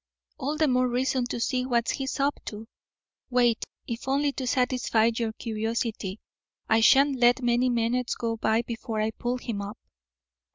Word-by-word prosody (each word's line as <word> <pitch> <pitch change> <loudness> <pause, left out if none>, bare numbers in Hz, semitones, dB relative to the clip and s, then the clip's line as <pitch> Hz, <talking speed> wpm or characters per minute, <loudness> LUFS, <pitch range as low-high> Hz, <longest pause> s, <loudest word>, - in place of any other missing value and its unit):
"All 290 +2 -2
the 310 0 +3
more 255 -1 +3
reason 250 0 0
to 245 - -4
see 250 +2 0
what 240 -2 +1
he's 270 +1 -3
up 280 +1 +1
to. 215 +1 -7 0.6
Wait, 240 -2 +2 0.2
if 235 +2 -6
only 280 +2 +2
to 265 -2 -5
satisfy 250 -3 +2
your 230 -1 -1
curiosity. 220 -3 -3 0.5
I 225 - +4
shan't 270 +5 +5
let 245 +1 +4
many 240 +1 +2
minutes 240 +1 0
go 230 -1 -2
by 220 +1 +1
before 225 -1 -4
I 215 +1 0
pull 240 +2 -2
him 230 -5 -4
up." 205 +2 -6
240 Hz, 165 wpm, -27 LUFS, 225-255 Hz, 0.6 s, shan't